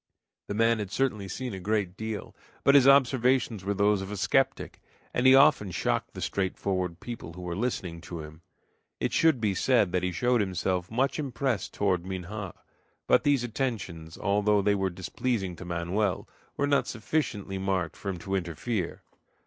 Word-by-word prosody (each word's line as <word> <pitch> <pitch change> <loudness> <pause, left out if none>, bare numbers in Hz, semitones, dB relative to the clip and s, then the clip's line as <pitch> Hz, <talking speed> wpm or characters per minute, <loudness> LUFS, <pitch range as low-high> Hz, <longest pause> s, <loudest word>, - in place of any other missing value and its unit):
The 100 - -3
man 115 +1 +3
had 105 -3 -4
certainly 105 -3 -1
seen 125 +3 -5
a 95 - -5
great 100 -2 -1
deal, 110 -1 -5 0.3
but 140 - +5
his 140 -2 +7
observations 130 -5 +4
were 100 +1 -1
those 100 0 +3
of 95 - -6
a 105 - -4
skeptic, 135 +7 0 0.3
and 125 +1 +3
he 130 - +9
often 135 -7 +5
shocked 85 - -1
the - - -6
straightforward 95 -2 -2
people 115 -8 -7
who 90 +1 -9
were 90 -1 -3
listening 95 -6 -3
to 85 -1 -7
him. 75 +1 -11 0.6
It - - -1
should 160 -6 +4
be 105 -3 +1
said 110 -2 +2
that 90 0 +1
he 90 0 -1
showed 120 +6 +2
himself 90 -2 -1
much 135 +6 0
impressed 130 -5 -2
toward 95 -4 +1
Minha. 95 +1 -6 0.5
But - - +4
these 140 -4 +3
attentions, 105 -10 -4
although 105 0 +2
they 105 - +3
were 95 -1 0
displeasing 95 +2 -2
to 95 - -8
Manoel, 90 +4 -1 0.3
were 140 - +2
not 145 -1 +2
sufficiently 110 -6 -2
marked 95 -3 -1
for 100 - -5
him 95 - -3
to 95 +3 -6
interfere. 90 +2 -2
100 Hz, 175 wpm, -28 LUFS, 90-120 Hz, 0.6 s, he